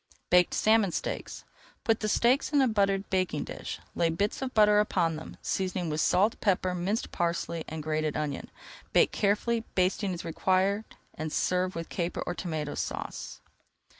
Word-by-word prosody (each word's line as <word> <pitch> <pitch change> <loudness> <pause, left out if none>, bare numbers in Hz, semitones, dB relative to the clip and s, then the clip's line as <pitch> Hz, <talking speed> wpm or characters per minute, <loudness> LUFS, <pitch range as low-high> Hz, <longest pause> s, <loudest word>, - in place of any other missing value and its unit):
BAKED 180 0 +5
SALMON 215 -3 +4
STEAKS - - -4 0.4
Put 225 -4 +2
the 215 - -1
steaks 250 +7 +3
in 290 - +4
a 265 - +5
buttered 195 -3 +1
baking 185 -5 0
dish. - - -6
Lay 170 - +2
bits 200 +9 -1
of 265 -1 -2
butter 210 -1 +6
upon 175 -6 +1
them, 160 - -9
seasoning 185 -3 -1
with 150 +1 0
salt, 205 +5 +2
pepper, 185 -3 +1
minced 185 +5 -2
parsley, 170 -1 -1
and 155 -1 -5
grated 155 -1 -1
onion. 145 -2 -3 0.4
Bake - - +5
carefully, 220 +3 +1
basting 190 +2 +1
as 170 - -7
required, 190 +5 +1 0.3
and 155 0 -5
serve 185 +3 0
with 165 0 -5
Caper 175 -1 -2
or 175 - -2
Tomato 160 -5 -3
Sauce. - - -5
185 Hz, 165 wpm, -29 LUFS, 165-210 Hz, 0.4 s, butter